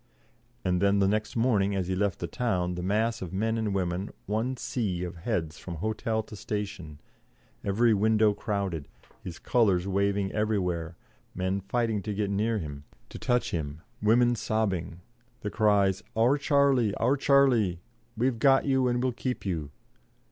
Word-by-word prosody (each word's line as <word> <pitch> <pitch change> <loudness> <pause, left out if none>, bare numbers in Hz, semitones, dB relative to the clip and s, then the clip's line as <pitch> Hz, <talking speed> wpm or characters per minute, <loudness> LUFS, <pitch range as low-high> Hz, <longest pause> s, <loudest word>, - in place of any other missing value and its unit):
And 90 0 +1
then 100 0 +3
the 100 -1 +3
next 105 +2 -1
morning, 105 -5 +2
as 95 -2 -1
he 95 - -1
left 100 -1 0
the - - -4
town, 90 -2 -1
the 90 - -4
mass 110 +5 0
of 90 - -5
men 110 +4 0
and 110 -2 -1
women, 95 0 -1 0.2
one 115 +5 -1
sea 95 -10 -2
of 90 -1 -6
heads 85 -4 -3
from 85 - -7
hotel 110 +4 -1
to 105 - -11
station, 100 -8 -5 0.6
every 110 +4 +3
window 110 +1 +3
crowded, 100 -8 -3 0.4
his 85 -2 -7
colours 100 -7 +2
waving 100 0 0
everywhere, 90 -6 -1 0.4
men 95 +2 -1
fighting 110 +1 -1
to 105 +1 -4
get 100 -1 -1
near 110 +3 +1
him, 75 -6 -6 0.3
to - - -9
touch 125 -1 0
him, 80 -1 -4 0.2
women 120 +3 +4
sobbing, 95 -7 -2 0.4
the 105 - -3
cries, 100 -3 +3
"Our 120 +6 +3
Charlie, 140 -7 +3
our 125 +5 +2
Charlie; 130 -10 +3 0.4
we've 120 0 +1
got 135 +2 +4
you 130 -2 +2
and 120 0 0
we'll 130 - +2
keep 125 -1 -4
you." 80 -6 -2
105 Hz, 160 wpm, -28 LUFS, 90-115 Hz, 0.6 s, women